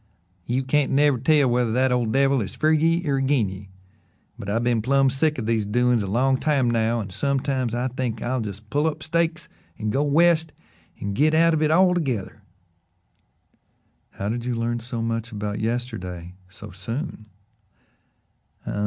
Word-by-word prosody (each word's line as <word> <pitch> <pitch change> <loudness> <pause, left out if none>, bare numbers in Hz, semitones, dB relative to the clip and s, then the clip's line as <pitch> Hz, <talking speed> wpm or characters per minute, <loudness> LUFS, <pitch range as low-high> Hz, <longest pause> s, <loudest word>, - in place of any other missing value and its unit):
"You 130 +2 0
can't 140 +1 +1
never 140 -2 +3
tell 145 +1 +3
whether 120 -1 +1
that 130 +1 +2
ole 125 -2 +1
devil 135 +2 +2
is 95 -3 -5
fer 155 - +2
ye 165 +2 +2
or 135 -1 +1
agin 135 -6 +1
ye, 95 +1 -10 0.7
but 100 - -6
I've 115 +3 0
been 120 -2 +1
plum' 135 +3 +3
sick 150 +3 0
o' 125 - -3
these 110 -1 0
doin's 120 +3 +2
a 100 - -3
long 130 +6 +1
time 140 -5 +1
now 115 0 +1
and 100 -3 -6
sometimes 130 0 -1
I 125 +2 -1
think 125 -3 -3
I'll 125 +1 -2
just 105 0 -7
pull 145 +3 +1
up 155 0 -3
stakes 165 0 -1 0.3
and 110 -1 -2
go 135 - +1
West 160 +2 +3 0.5
and 100 0 -3
git 155 +8 +2
out 165 +1 +4
of 160 - +1
hit 155 0 +2
altogether." 160 - +1 1.7
"How 100 - -4
did 115 +2 -2
you 125 0 -2
learn 120 +1 -1
so 115 0 -4
much 115 0 -3
about 105 -1 -4
yesterday 95 -7 -4 0.2
so 105 +1 -11
soon?" 110 - -6
125 Hz, 170 wpm, -23 LUFS, 110-145 Hz, 1.7 s, out